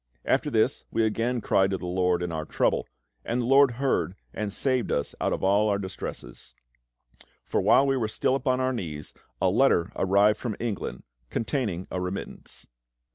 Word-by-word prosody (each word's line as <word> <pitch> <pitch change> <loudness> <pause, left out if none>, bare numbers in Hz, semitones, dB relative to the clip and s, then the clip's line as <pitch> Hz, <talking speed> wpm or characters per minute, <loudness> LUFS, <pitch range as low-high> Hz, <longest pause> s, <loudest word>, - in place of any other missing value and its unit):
After - - +1
this - - +1
we 115 - +1
again 115 +3 0
cried 95 -2 +2
to 95 - -1
the 90 - -8
LORD 90 0 +1
in 90 - -3
our 80 -1 -3
trouble, - - 0 0.4
and 120 +2 -1
the 120 - -1
LORD 135 +1 +6
heard 130 -7 0 0.2
and 105 -2 -3
saved 130 +3 0
us 70 - -1
out - - +1
of - - -2
all 100 +3 +3
our 100 - +2
distresses. 95 -10 -7 0.9
For - - 0
while 135 - +5
we 135 -1 +2
were 115 -4 0
still 110 - 0
upon 130 -1 +1
our 130 0 +1
knees 75 -10 -6 0.3
a - - +2
letter 85 - +3
arrived 100 +3 +3
from 115 -4 -3
England 105 - -4 0.3
containing 110 - -2
a 90 - -2
remittance. 90 +2 -6
105 Hz, 180 wpm, -26 LUFS, 90-125 Hz, 0.9 s, LORD